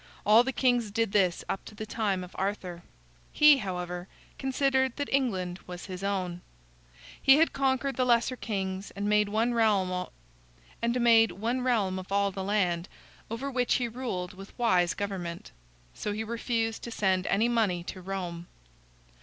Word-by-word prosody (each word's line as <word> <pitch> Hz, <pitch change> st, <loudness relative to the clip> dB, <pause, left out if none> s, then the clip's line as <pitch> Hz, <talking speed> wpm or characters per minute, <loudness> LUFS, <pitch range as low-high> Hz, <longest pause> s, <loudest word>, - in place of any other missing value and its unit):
All 220 Hz, +3 st, +7 dB
the 265 Hz, -, -1 dB
kings 245 Hz, -3 st, +1 dB
did 225 Hz, 0 st, 0 dB
this 185 Hz, -4 st, +2 dB
up 195 Hz, -, -3 dB
to 215 Hz, -, -11 dB
the 215 Hz, -, -5 dB
time 205 Hz, -4 st, -1 dB
of 180 Hz, -, -10 dB
Arthur. 190 Hz, -3 st, -3 dB, 0.5 s
He, 300 Hz, -1 st, +7 dB
however, 180 Hz, -3 st, -4 dB, 0.3 s
considered 265 Hz, -1 st, +1 dB
that 285 Hz, -1 st, -3 dB
England 190 Hz, -10 st, 0 dB
was 180 Hz, -1 st, -7 dB
his 185 Hz, 0 st, -7 dB
own. 185 Hz, -3 st, -2 dB, 0.8 s
He 270 Hz, -, +7 dB
had 325 Hz, +1 st, +3 dB
conquered 270 Hz, -1 st, 0 dB
the 255 Hz, -, +3 dB
lesser 240 Hz, +1 st, +3 dB
kings, 195 Hz, -4 st, -4 dB
and 200 Hz, +1 st, -2 dB
made 210 Hz, 0 st, +3 dB
one 225 Hz, +3 st, +1 dB
realm 210 Hz, -5 st, +2 dB
of 180 Hz, 0 st, -3 dB, 2.0 s
all 200 Hz, 0 st, +2 dB
the 195 Hz, 0 st, -5 dB
land, 185 Hz, -3 st, 0 dB, 0.4 s
over 255 Hz, +5 st, -4 dB
which 250 Hz, -1 st, +1 dB
he 245 Hz, -, 0 dB
ruled 225 Hz, -7 st, -4 dB
with 195 Hz, +1 st, -12 dB
wise 185 Hz, -7 st, +2 dB
government. 185 Hz, -4 st, -5 dB, 0.4 s
So 210 Hz, -, -3 dB
he 215 Hz, +1 st, -3 dB
refused 225 Hz, 0 st, -2 dB
to -, -, -6 dB
send 190 Hz, -4 st, 0 dB
any 215 Hz, +4 st, +2 dB
money 215 Hz, -7 st, +1 dB
to 185 Hz, +1 st, -7 dB
Rome. 175 Hz, -2 st, -5 dB
205 Hz, 155 wpm, -28 LUFS, 185-235 Hz, 2.0 s, All